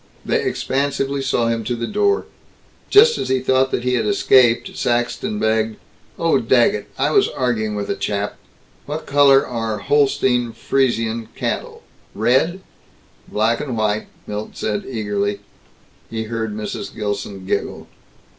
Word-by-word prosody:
They - - +1
expansively 140 0 -1
saw 125 -3 +1
him 115 -1 -1
to 120 +2 -1
the 115 0 -3
door. 405 - +1 0.6
Just 465 +3 +6
as - - -3
he 130 0 +2
thought 130 +1 +2
that 120 - -2
he 125 0 0
had 125 - +1
escaped, 130 - +3
Saxton 120 - -1
begged, 110 - +1 0.4
"Oh, 165 -5 +2
Daggett, 115 -4 +2
I 140 +3 +1
was 200 +5 +4
arguing 110 -4 -1
with 100 -1 -3
a - - -1
chap 100 0 -2 0.5
What 150 +2 -4
color 140 -1 +5
are 115 -3 -3
Holstein 125 -1 +1
Friesian 115 -2 0
cattle? - - -4 0.3
Red?" 130 - +2 0.7
"Black 115 +2 +1
and 130 -6 -4
white," 110 0 0 0.2
Milt 105 +1 -6
said 105 -1 -2
eagerly. 105 -4 -2 0.7
He 110 -1 -3
heard 110 -1 -3
Mrs. 105 -1 -5
Gilson 100 -2 -4
giggle. - - -3
120 Hz, 140 wpm, -20 LUFS, 110-135 Hz, 0.7 s, Just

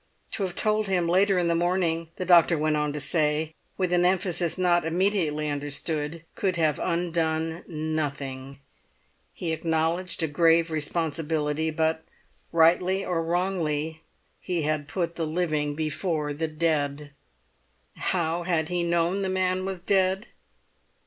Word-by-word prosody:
To - - -3
have 185 -2 -2
told 215 -1 +2
him 180 -3 +1
later 190 +2 +3
in 175 -1 +2
the 170 - +2
morning, 170 -1 0
the 185 - -4
doctor 170 -1 +6
went 155 0 +1
on 150 0 0
to 150 - -3
say, 155 +1 0 0.2
with 185 -2 0
an 175 0 +4
emphasis 180 -2 +1
not 175 -1 +3
immediately 165 -3 0
understood, 150 +2 -3
could 190 -3 -1
have 155 -3 +1
undone 165 -1 -1
nothing. 145 -4 -4 0.7
He 170 - -4
acknowledged 165 +2 -1
a - - +2
grave 165 +2 +3
responsibility, 155 0 -1
but 160 0 0 0.5
rightly 180 +4 +3
or 175 -2 0
wrongly 165 -3 -1 0.4
he 175 -4 -2
had 150 -1 -1
put 170 -1 -3
the 165 -2 -1
living 155 -3 -1
before 155 -1 -1
the 160 +3 -2
dead. 150 -2 -1 0.8
How 170 -2 0
had 170 -2 0
he 180 -1 0
known 170 +3 +1
the 190 - -1
man 185 0 0
was 190 -1 -3
dead? 190 +2 +1
165 Hz, 140 wpm, -26 LUFS, 155-180 Hz, 0.8 s, doctor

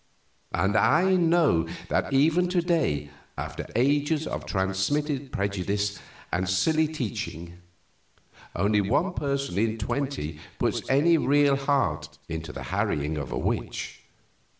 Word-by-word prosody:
And 100 +2 +1
I 175 +12 +4
know 165 - +3 0.2
that - - 0
even 160 +6 +3
to 180 -1 +2
day, 135 - 0 0.3
after - - -5
ages 145 +5 +2
of - - -5
transmitted 130 +10 -1
prejudice 100 +1 -1 0.3
and 90 +1 0
silly 155 - +2
teaching, 90 - -5 1.0
only 105 +3 +2
one 145 - +1
person 140 - -2
in 110 0 +1
twenty 115 - -3 0.2
puts - - 0
any 155 +5 +4
real 145 0 +4
heart 140 -1 0
into 80 -1 -5
the - - -7
harrying 75 +2 0
of 65 -4 -6
a - - -2
witch. - - -3
130 Hz, 125 wpm, -26 LUFS, 95-150 Hz, 1.0 s, I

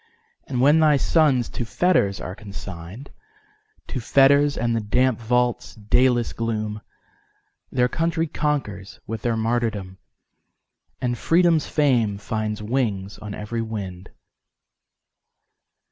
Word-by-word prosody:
And 125 -2 -1
when 145 +4 +5
thy 155 -2 +5
sons 140 -5 +2
to - - -4
fetters 120 - +1
are 90 - -6
consign'd, 95 +3 -9 0.8
To 130 - -3
fetters, 140 +4 +4
and 120 -1 0
the - - +1
damp 125 +3 +1
vault's 125 +1 0
dayless 120 +3 +2
gloom, 110 -2 -3 0.9
Their 125 -1 +2
country 165 +3 0
conquers 125 -11 -3
with 110 -1 -5
their 115 -2 0
martyrdom, 110 -5 -2 1.0
And 120 -2 -1
Freedom's 165 - +3
fame 120 -9 +2
finds 105 +1 -3
wings 105 -5 -2
on 105 -1 -7
every 115 +2 -4
wind. 100 -5 -6
115 Hz, 115 wpm, -23 LUFS, 105-135 Hz, 1.0 s, when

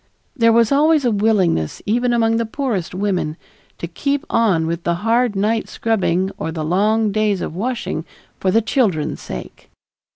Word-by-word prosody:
There 230 -4 +4
was 230 +1 +3
always 300 0 +3
a 240 - +3
willingness, 200 - +1
even 240 +4 +1
among 225 -1 +2
the 230 - 0
poorest 220 - -3
women, 185 -5 -1 0.4
to - - -5
keep 280 - -2
on 195 -8 +2
with 170 +1 -2
the 170 - 0
hard 235 -1 +2
night 215 +3 0
scrubbing 190 -4 0
or 160 - -3
the 160 -1 -4
long 210 +5 +2
days 210 -2 +1
of 160 - -5
washing 235 +5 -3 0.4
for 190 - 0
the 225 +4 +3
children's 210 - 0
sake. 60 - -9
215 Hz, 165 wpm, -19 LUFS, 180-230 Hz, 0.4 s, There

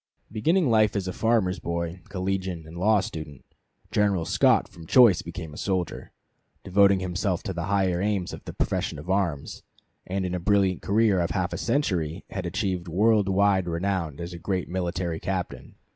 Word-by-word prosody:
Beginning 160 - +2
life 110 -3 +3
as 95 -2 -1
a 90 - -3
farmer's 110 -5 +1
boy, 85 +1 -4
collegian, 95 -3 -3
and 80 +1 -11
law 105 +3 +3
student, 80 - -7 0.5
General 100 -6 +1
Scott - - +3
from 80 -1 -13
choice 115 -7 +6
became 80 -2 -7
a - - -10
soldier, 95 -3 -2 0.5
devoting 100 0 +4
himself 90 +1 -1
to 95 - -3
the 85 -1 -3
higher 95 -2 +1
aims 100 -3 -1
of - - -9
the - - -7
profession - - -1
of 80 +6 -5
arms, 85 -8 -1 0.5
and 95 +1 -2
in 90 - -3
a 90 - -1
brilliant 95 0 +2
career 105 -1 +2
of 85 0 0
half 95 -3 -1
a - - -3
century 95 - -1
had 95 -2 -3
achieved 90 0 -2
world 105 +3 +3
wide 95 -1 +3
renown 85 -3 -2
as 85 +1 -6
a 85 - -8
great 95 0 -2
military 85 -2 -2
captain. 95 -2 -4
95 Hz, 175 wpm, -26 LUFS, 85-100 Hz, 0.5 s, choice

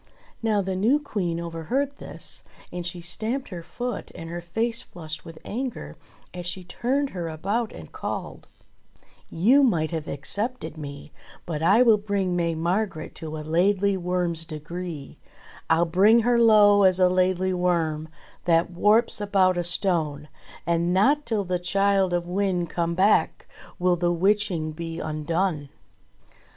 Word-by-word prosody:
'* - - -27
Now 215 -3 +2
the 190 0 -2
new 225 +10 +3
Queen 185 - -2
overheard 170 - -2
this, - - -9 0.3
and 180 0 -4
she 175 0 -6
stamped 225 +10 -2
her 180 -4 -6
foot 240 +9 -5
and 165 0 -8
her 175 0 -4
face 225 +7 -1
flushed 160 -3 -7
with 165 -2 -11
anger 235 - -5 0.4
as 175 -1 -6
she 185 +1 -3
turned 260 +10 -1
her 175 -3 -4
about 200 +9 -2
and - - -11
called: - - -6 0.8
"You 235 +12 +4
might 170 - +2
have 160 -2 -4
excepted 185 - -3
me, 145 -1 -8 0.3
But 160 -3 -4
I 200 +9 +5
will 225 -4 +5
bring 200 -3 -1
May 170 -1 0
Margret 170 +1 -2
to 155 -1 -5
a 155 - -7
Laidly 195 +5 +2
Worm's 175 -2 -1
degree; 160 -1 -7 0.5
I'll 165 +1 +4
bring 200 +7 +5
her 240 +1 +3
low 210 -3 +6
as 190 -1 +4
a 185 - +6
Laidly 185 0 +1
Worm 165 -3 0 0.4
That 170 0 +3
warps 210 +5 +2
about 195 -3 +3
a 175 - -1
stone. 165 -5 -1 0.4
And 170 +1 +1
not 285 +10 +3
till 220 -3 0
the 180 -1 -1
Childe 195 +1 +2
of 175 0 0
Wynde 180 -2 -1
come 170 -1 -1
back 195 +4 +2 0.3
Will 180 -1 +2
the 175 0 +1
witching 185 -3 +1
be 165 +1 -6
undone." 155 0 -2
180 Hz, 155 wpm, -25 LUFS, 165-205 Hz, 0.8 s, low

